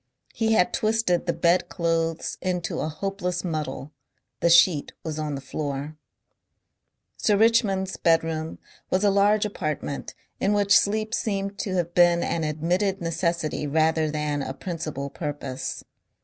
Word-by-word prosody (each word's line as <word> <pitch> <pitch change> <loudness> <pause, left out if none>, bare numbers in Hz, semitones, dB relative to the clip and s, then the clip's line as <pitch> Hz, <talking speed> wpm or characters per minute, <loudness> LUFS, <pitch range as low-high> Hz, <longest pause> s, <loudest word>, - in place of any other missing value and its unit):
He 225 -1 +1
had 180 -5 +3
twisted 215 -5 +1
the - - +3
bed 175 +1 +2
clothes 165 -1 -1
into 180 -2 -2
a 155 - -1
hopeless 180 +1 -3
muddle, 150 -5 -4 0.5
the 170 - +2
sheet 170 -3 +5
was 155 -1 -4
on 150 -2 -2
the 135 - -6
floor. 140 +2 -4 1.2
Sir 205 -2 +2
Richmond's 200 -4 +2
bedroom 160 -1 +1 0.3
was 185 +2 +1
a 205 - +4
large 205 +2 +3
apartment 155 -8 -4 0.2
in 205 - +2
which 205 -1 +4
sleep 215 +2 +2
seemed 200 -3 -2
to 190 -2 -2
have 175 -1 -1
been 175 -1 +5
an 165 - -1
admitted 175 +6 0
necessity 165 -2 -1
rather 160 +1 +2
than 150 -1 -2
a 135 0 -4
principal 155 -6 -5
purpose. 145 -4 -5
170 Hz, 140 wpm, -25 LUFS, 155-195 Hz, 1.2 s, sheet